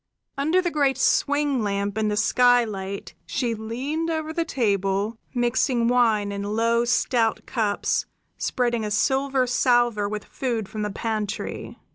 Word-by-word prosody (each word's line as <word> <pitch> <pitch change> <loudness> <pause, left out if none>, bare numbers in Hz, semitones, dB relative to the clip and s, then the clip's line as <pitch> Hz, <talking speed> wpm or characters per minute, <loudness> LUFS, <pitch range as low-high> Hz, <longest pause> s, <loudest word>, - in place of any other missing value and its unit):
Under 315 +7 +2
the 350 - 0
great 280 -4 +2
swing 285 -1 +2
lamp 200 -1 -1
in 220 -1 0
the 210 0 -1
skylight 215 -5 +2
she 240 -3 -1
leaned 260 +9 -3
over 315 -1 -2
the 335 - 0
table, 205 - 0 0.2
mixing 240 0 +1
wine 225 -4 +2
in 200 0 -4
low, 230 +3 +1
stout 240 -1 +1
cups, 215 -4 0 0.3
spreading 240 -2 -1
a 210 - -2
silver 265 +4 +1
salver 240 -4 +2
with 210 0 -5
food 235 -6 -3
from 215 - -6
the 210 - -1
pantry. 215 0 -4
235 Hz, 140 wpm, -24 LUFS, 210-265 Hz, 0.3 s, Under